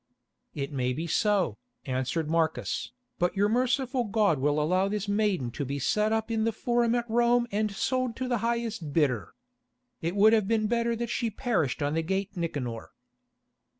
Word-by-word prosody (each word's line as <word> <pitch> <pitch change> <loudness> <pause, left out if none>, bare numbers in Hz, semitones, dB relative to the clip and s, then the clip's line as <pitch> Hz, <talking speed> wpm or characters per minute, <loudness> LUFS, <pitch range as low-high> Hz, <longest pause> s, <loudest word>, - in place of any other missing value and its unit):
"It 140 -1 -3
may 125 -3 0
be 160 +6 -3
so," 185 - +1 0.3
answered 130 +4 -1
Marcus, 160 0 -1 0.3
"but 175 +2 +1
your 205 +1 +4
merciful 255 +2 +1
God 205 -8 +2
will 145 +2 +1
allow 185 +6 +2
this 205 0 -2
maiden 200 - 0
to 145 - -4
be 140 +1 -3
set 210 - +1
up 225 +1 -1
in 220 -1 +1
the 225 - +2
Forum 235 +1 +1
at 240 -1 -1
Rome 240 +1 +3
and 210 +1 0
sold 255 +4 -1
to 260 - -3
the 245 -2 0
highest 230 -9 -2
bidder. 125 - +1 0.7
It 170 +3 -2
would 215 +2 +6
have 215 -3 +3
been 220 -1 +1
better 235 +1 +1
that 235 0 -3
she 235 - 0
perished 195 - -1
on 145 +1 0
the 165 - +1
gate 195 +4 -2
Nicanor." 135 -10 -4
205 Hz, 180 wpm, -28 LUFS, 155-230 Hz, 0.7 s, would